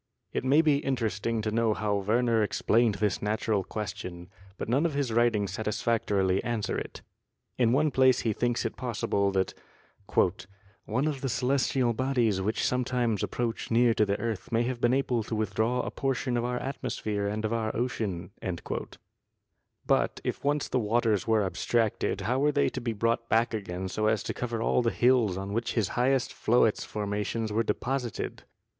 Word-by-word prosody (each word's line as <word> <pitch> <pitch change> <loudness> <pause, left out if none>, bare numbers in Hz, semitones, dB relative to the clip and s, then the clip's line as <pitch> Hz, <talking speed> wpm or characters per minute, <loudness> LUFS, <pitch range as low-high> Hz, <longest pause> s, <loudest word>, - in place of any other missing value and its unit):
It - - -1
may 140 +5 +4
be 150 -3 +4
interesting 115 -5 -1
to 110 - -1
know 110 -1 +2
how 105 -1 -1
Werner 115 +3 +2
explained 110 +1 +2
this 100 -1 0
natural 105 -1 0
question, 90 -4 -6 0.3
but - - -4
none 130 +7 +2
of 155 - -5
his 140 -5 -1
writings 110 -5 +2
satisfactorily 105 -2 0
answer 115 -4 -2
it. - - -6 0.6
In 120 -2 +4
one 150 +4 +3
place 130 -1 +4
he 110 - 0
thinks 120 +2 0
it - - -2
possible 105 -5 0
that 95 -1 0 1.3
"one 125 +6 0
of 140 -4 -2
the 135 - -1
celestial 125 -1 +1
bodies 120 -5 +1
which 105 +4 0
some 125 0 +1
times 120 -4 0
approach 115 -2 -2
near 115 0 +4
to 110 - +3
the 100 -1 0
earth 115 -3 -4
may 115 +1 +2
have 120 0 -3
been 120 - +4
able 125 -3 +1
to 110 +1 -4
withdraw 110 +4 0
a - - -4
portion 135 -1 -1
of 120 - 0
our 125 0 -1
atmosphere 105 -6 -3
and 110 +2 -2
of 110 - -1
our 110 -1 0
ocean." 110 -7 -2 1.5
But - - +1
if - - -3
once 145 0 +1
the 130 - 0
waters 110 -3 +1
were 110 -2 +3
abstracted, 110 +3 0
how 125 +3 0
were 145 +2 +3
they 145 -1 +2
to 130 - -5
be 120 -1 -2
brought 115 +2 0
back 115 +1 +2
again 95 -3 -4
so 110 +3 -1
as 110 -1 +1
to - - -3
cover 115 -2 -3
all - - +2
the 120 - +2
hills 120 -6 +3
on 100 +1 -4
which 115 +2 -1
his 110 -6 +1
highest 130 +1 +1
Floetz 115 -2 +2
formations 105 +1 -3
were 110 - +2
deposited? 120 +2 -3
115 Hz, 180 wpm, -28 LUFS, 105-125 Hz, 1.5 s, may